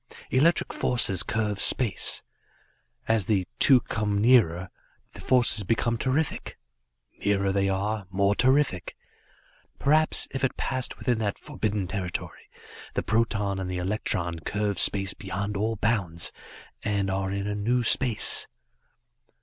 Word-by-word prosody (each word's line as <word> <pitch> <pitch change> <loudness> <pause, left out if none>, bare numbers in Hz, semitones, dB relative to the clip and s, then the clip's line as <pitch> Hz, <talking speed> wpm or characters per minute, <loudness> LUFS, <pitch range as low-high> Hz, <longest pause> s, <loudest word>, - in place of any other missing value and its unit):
"Electric 150 +7 +2
force 105 -7 +1
curves 105 -3 -2
space. 115 -7 +3 0.8
As 110 -5 +1
the 95 -4 +1
two 130 -3 +6
come 105 -2 -2
nearer, 100 -7 +3 0.4
the - - -12
forces 120 -4 +2
become 115 +4 0
terrific; 135 +3 -2 0.6
nearer 100 -1 0
they 100 0 0
are; 100 +1 -2
more 100 +2 +1
terrific. 130 -5 +1 0.8
Perhaps, 155 +2 +2
if 135 - -5
it 135 - -1
passed 130 -2 -3
within 120 -3 -1
that 105 -3 -2
forbidden 105 -3 -3
territory, 90 -1 -6 0.5
the - - -1
proton 105 -4 0
and 95 -1 -4
the 90 - -3
electron 90 -2 -2
curve 105 +4 -2
space 95 -1 +3
beyond 100 +1 -5
all 110 +3 -1
bounds 100 -6 0 0.5
and 100 -2 -1
are 95 0 -2
in 100 0 -3
a 105 - -2
new 120 +4 0
space." 120 -2 +4
105 Hz, 130 wpm, -26 LUFS, 95-120 Hz, 0.8 s, two